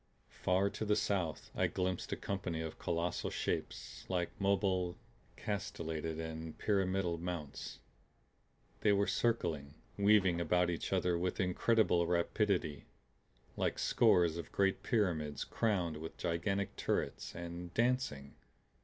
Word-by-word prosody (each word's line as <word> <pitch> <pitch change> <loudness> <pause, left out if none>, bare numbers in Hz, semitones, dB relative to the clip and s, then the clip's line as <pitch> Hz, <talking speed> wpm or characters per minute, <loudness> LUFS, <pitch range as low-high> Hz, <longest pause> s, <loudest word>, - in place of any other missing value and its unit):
Far 95 +2 +3
to - - -4
the 105 -1 +3
south 95 -7 -1
I - - +2
glimpsed 90 -1 -2
a - - +1
company 95 -4 -3
of 80 -1 -5
colossal 85 +1 -1
shapes - - -3
like 90 -2 0
mobile, 95 -2 +1 0.4
castellated 80 -6 -3
and 80 0 -5
pyramidal 95 -4 +1
mounts. 85 -5 -5 1.0
They 105 - +4
were 100 0 +3
circling, 80 -14 0 0.2
weaving 100 -4 +5
about 90 +1 +2
each 85 - -3
other 90 -1 +2
with 90 +1 -1
incredible 90 -1 +3
rapidity 85 -3 +1 0.7
like - - 0
scores 85 -2 +4
of 85 - -6
great 95 -1 +2
pyramids 80 - 0
crowned 90 -8 0
with 80 +1 -7
gigantic 95 +3 -1
turrets - - -1
and 85 0 -6
dancing. 115 - 0
90 Hz, 120 wpm, -35 LUFS, 85-100 Hz, 1.0 s, weaving